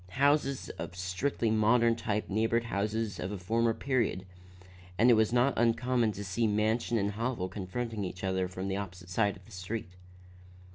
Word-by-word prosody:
Houses 140 0 +2
of - - -5
strictly 95 +6 -1
modern 115 +2 +4
type 105 -2 -2
neighbored 115 +3 +1
those 105 0 -1
of 90 - -3
a 105 - -3
former 115 +5 +1
period, 120 -8 0 0.7
and 120 +4 +6
it - - +8
was 110 -1 +3
not 125 +2 +3
uncommon 120 0 +2
to 100 - -6
see 100 +4 0
mansion 110 +3 +1
and 100 -1 0
hovel 115 -2 -2
confronting 105 +3 -4
each 90 0 -6
other 95 -1 0
from 95 +1 -5
the 95 0 -1
opposite 90 -2 -7
side 100 +1 +1
of 95 - -18
the 115 - -17
street. 90 +1 -5
110 Hz, 175 wpm, -30 LUFS, 95-115 Hz, 0.7 s, it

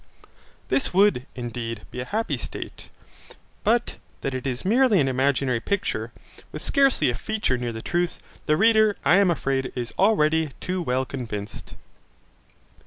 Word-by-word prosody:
This 265 - 0
would, 195 -10 +4
indeed, 115 -2 -5
be - - -6
a 125 - -3
happy 220 - -1
state. - - -8 0.7
But 235 +2 +1 0.2
that 135 - -2
it 130 +1 -3
is 125 +3 -3
merely 230 0 +4
an 135 - +3
imaginary 130 -1 +1
picture, 200 - -2 0.4
with - - -7
scarcely 275 -2 +3
a - - -3
feature 215 - -1
near 120 -1 -3
the 115 0 -7
truth, 175 0 -1 0.3
the 150 - +3
reader, 215 0 +4
I 175 - +6
am 200 -2 +4
afraid, 135 -5 -1
is 120 -2 -4
already 160 -7 +3
too 185 0 -2
well 130 -4 0
convinced. 110 -6 -6
150 Hz, 150 wpm, -24 LUFS, 125-205 Hz, 0.7 s, I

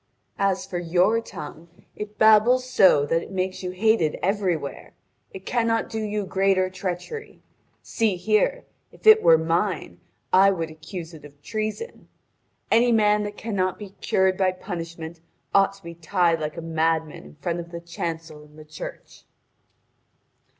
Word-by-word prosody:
As 195 -1 +1
for 175 - -4
your 180 +6 +2
tongue, 160 -5 -9 0.3
it 210 0 -7
babbles 220 +4 +5
so 185 - +5
that 165 +3 +1
it - - -10
makes 185 -1 -3
you 180 - -4
hated 185 -4 +1
everywhere. 185 -7 -2 0.4
It 190 0 -10
cannot 230 -2 0
do 220 - -3
you 210 -1 -2
greater 190 -1 +1
treachery. 185 - -6 0.4
See 220 -5 0
here: 215 - +1 0.3
if - - -20
it 435 0 +8
were 165 - +6
mine, 165 - -1 0.3
I 195 +1 +7
would 165 -5 -2
accuse 165 +2 -8
it 155 - -12
of 145 -1 -14
treason. 215 - -5 0.6
Any 240 +1 +4
man 210 -2 +3
that 205 0 -7
cannot 190 -5 -1
be 205 -2 -9
cured 190 -1 +2
by 185 -1 +2
punishment 165 -3 -7 0.3
ought 195 0 +4
to 195 -1 -19
be 170 0 -8
tied 170 0 +1
like 155 +2 -4
a - - -4
madman 160 -1 -1
in 75 0 -15
front 170 - -3
of 170 0 -7
the 170 0 -7
chancel 165 -2 -6
in 150 0 -19
the 155 0 -13
church." 155 0 -10
185 Hz, 155 wpm, -24 LUFS, 165-210 Hz, 0.6 s, it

